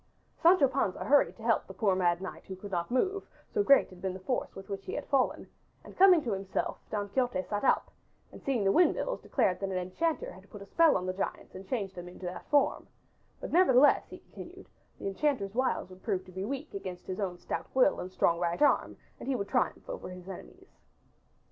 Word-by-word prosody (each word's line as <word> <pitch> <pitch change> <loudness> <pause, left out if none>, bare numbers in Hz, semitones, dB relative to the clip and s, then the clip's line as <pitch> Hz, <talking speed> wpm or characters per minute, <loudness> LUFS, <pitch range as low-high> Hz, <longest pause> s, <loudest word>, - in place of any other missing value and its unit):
Sancho 335 -4 +6
Panza 255 -8 -1
hurried 285 0 +4
to 225 - -12
help 230 -1 +1
the 190 - -10
poor 200 -4 +2
mad 175 -1 +1
knight 160 -4 -7
who 190 - -7
could 200 +2 -10
not 170 -2 -2
move, 380 +11 0 0.3
so 425 - +2
great 280 -8 +5
had 180 -1 -14
been 190 0 -2
the - - -7
force 245 +7 -3
with 195 0 -9
which 195 -1 -5
he - - -5
had - - -4
fallen, 275 -2 +1 0.4
and - - -13
coming 365 -4 +6
to 235 - -2
himself 195 0 -3
Don 205 -1 -2
Quixote 245 -4 0
sat 205 +3 -3
up - - +2 0.4
and - - -12
seeing 255 -6 0
the 195 - +3
windmills 360 - +2
declared 200 -9 +1
that 195 - -2
an 190 - -2
enchanter 185 - -2
had 190 +2 -15
put 205 -1 -10
a - - -12
spell 325 - +4
on 185 - -4
the 185 - -2
giants 190 - -4
and 190 +1 -10
changed 200 -6 -2
them 175 -1 -8
into 180 +1 -10
that 180 +1 -7
form, 290 -1 +2 0.5
but - - -6
nevertheless, 290 -6 +5
he - - -9
continued, - - -12 0.3
the - - -9
enchanter's 200 -1 -1
wiles 255 -6 -1
would 185 0 -13
prove 190 -4 -2
to 185 - -13
be 190 +1 -5
weak 280 +5 -5
against 185 -2 -6
his 185 +1 -5
own 185 -3 -2
stout - - -5
will 265 +2 +4
and 185 - -6
strong 170 -2 +2
right 175 +8 0
arm - - +2 0.2
and - - -6
he 270 - +1
would 200 -4 -3
triumph - - 0
over - - -6
his 180 0 -10
enemies. 370 - -11
200 Hz, 225 wpm, -30 LUFS, 185-275 Hz, 0.5 s, Sancho